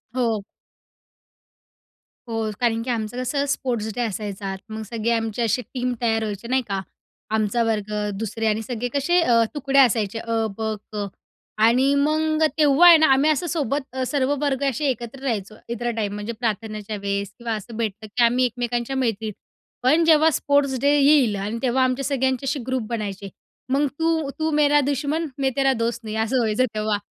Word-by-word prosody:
हो. 230 -5 0 1.9
हो, 225 -1 -1
कारण 230 -2 +1
की 255 - -6
आमचं 225 0 -2
कसं 280 +3 -1
स्पोर्ट्स 235 -5 -2
डे 245 - -1
असायचा 200 -3 -3
मग 220 0 -5
सगळी 230 -1 -2
आमची 225 0 -1
अशी 230 +2 +1
टीम 250 -1 -1
तयार 225 -2 +1
व्हायची 210 +1 -5
नाही 260 +1 +2
का. 195 -2 -2 0.5
आमचा 220 +2 +1
वर्ग, 215 -2 -1 0.3
दुसरे 225 +1 -3
आणि 215 +1 +1
सगळे 245 +1 -3
कसे 315 +6 +2
अ, 235 -7 +4
तुकडे 275 -2 +1
असायचे 225 -4 +3
अ, 230 0 -3 0.2
ब, 225 - -7 0.3
क 205 -1 -2 0.6
आणि 255 +5 +4
मग 310 +2 +1
तेव्हा 300 +2 +6
आहे 340 -1 +10
ना 315 0 +4
आम्ही 275 +3 +3
असं 325 +4 -1
सोबत 295 -3 -1
अ, 260 - -2
सर्व 280 0 +1
वर्ग 280 -2 0
असे 290 +3 -3
एकत्र 245 +1 -4
राहायचो 215 -5 -2 0.2
इतरा 240 +1 -2
टाईम 205 -2 -1
म्हणजे 210 +3 -4
प्रार्थनेच्या 215 -2 -3
वेळेस 200 0 -3
किंवा 235 -1 -3
असं 220 +2 -8
भेटलं, 215 -1 -3
की 240 +4 +1
आम्ही 245 +2 +4
एकमेकांच्या 240 +1 -2
मैत्रीण. 225 -4 -1 0.5
पण 305 +7 +4
जेव्हा 315 0 +6
स्पोर्ट्स 280 -2 +1
डे 280 - +3
येईल 275 -6 +5
आणि 205 +3 -3
तेव्हा 260 +1 +2
आमच्या 255 +1 0
सगळ्यांचे 265 -1 0
अशी 280 0 -1
ग्रुप 260 -1 0
बनायचे 200 -4 -4 0.4
मग 280 +2 +2
तू 320 -3 +1
तू 315 0 +1
मेरा 295 -1 +4
दुश्मन 290 +3 -1
मैं 265 -1 +1
तेरा 270 -1 +3
दोस्त 230 0 -2
नही, 215 -1 -5
असं 225 +4 0
व्हायचं 225 +2 +2
तेव्हा 215 -1 0
240 Hz, 175 wpm, -23 LUFS, 220-275 Hz, 1.9 s, आहे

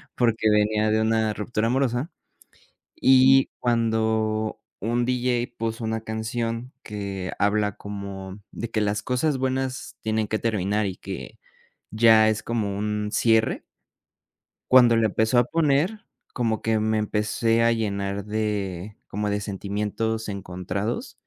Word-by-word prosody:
porque 115 -3 +2
venía 105 0 +2
de 110 0 +2
una 110 -1 +1
ruptura 110 +1 -1
amorosa. 130 +3 0 0.8
Y 135 +1 +5
cuando 110 -2 0 0.2
un 120 +3 0
diyey 125 -1 0
puso 115 -1 -4
una 110 0 -2
canción, 115 +2 -3
que 100 -3 -5
habla 105 0 +1
como 100 -1 -7
de 115 - -5
que 110 - 0
las 105 0 -1
cosas 135 +3 0
buenas 130 0 -2
tienen 110 -1 0
que 110 +1 -1
terminar, 105 -1 0
y 95 - -5
que - - -8 0.5
ya 110 0 +6
es 110 0 0
como 105 -4 -2
un 105 0 -2
cierre. 110 -1 +2 1.1
Cuando 120 -3 +7
la 115 - +3
empezó 110 +3 +1
a 120 - +3
poner, 165 - +1 0.3
como 115 -3 -1
que 110 0 +1
me 110 0 +1
empecé 110 +2 +1
a 115 - +4
llenar 100 -3 -2
de 105 -2 -3
como 105 +1 -2
de 105 - 0
sentimientos 105 +2 -3
encontrados. 100 +2 -4
110 Hz, 135 wpm, -24 LUFS, 105-115 Hz, 1.1 s, Cuando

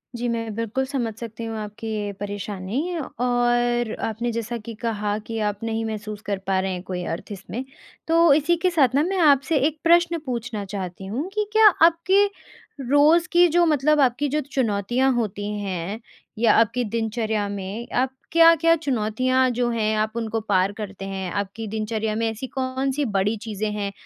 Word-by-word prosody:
जी 240 +1 -2
मैं 230 -2 -3
बिल्कुल 230 +4 -1
समझ 255 -5 -2
सकती 230 -1 -7
हूँ 225 -1 -4
आपकी 210 +1 -7
ये 205 -1 -2
परेशानी 205 - -3
और 240 -3 0 0.2
आपने 235 +2 -3
जैसा 230 +1 -3
कि 230 +1 -8
कहा 210 -2 -1
कि 225 -1 -3
आप 205 +1 -7
नहीं 225 0 -2
महसूस 215 -1 -5
कर 200 -1 -1
पा 190 -1 +2
रहे 190 0 -1
हैं 180 - -6
कोई 180 -1 -4
अर्थ 170 +5 -5
इसमें। 205 +5 -6 0.4
तो 330 -2 +5
इसी 310 +4 +3
के 370 - +3
साथ 275 -7 +2
ना 290 - +4
मैं 380 +2 -1
आपसे 285 0 +4
एक 310 -1 -5
प्रश्न 340 0 +4
पूछना 235 -5 -4
चाहती 190 -1 -6
हूँ 245 - -3
कि 425 0 -1
क्या 440 0 +7 0.2
आपके 345 +4 +4 0.6
रोज़ 305 +5 +5
की 350 0 +6
जो 345 +1 +3
मतलब 300 0 +3
आपकी 265 +3 +2
जो 300 - 0
चुनौतियाँ 240 +2 +1
होती 210 -4 -2
हैं 195 +1 -4 0.4
या 225 -1 +4
आपकी 230 +2 +3
दिनचर्या 220 -1 -1
में, 200 +4 -5
आप 255 +1 +2 0.2
क्या-क्या 330 0 +6
चुनौतियाँ 255 -2 +1
जो 245 0 0
हैं 220 -2 0
आप 215 0 0
उनको 225 -1 -2
पार 195 -2 +1
करते 195 -2 -6
हैं? 190 -2 -4
आपकी 205 +3 -4
दिनचर्या 215 0 -2
में 230 0 0
ऐसी 225 +4 -5
कौन-सी 265 +2 -2
बड़ी 205 -1 0
चीज़ें 215 -1 -3
हैं 200 -1 -2
230 Hz, 175 wpm, -23 LUFS, 210-270 Hz, 0.6 s, क्या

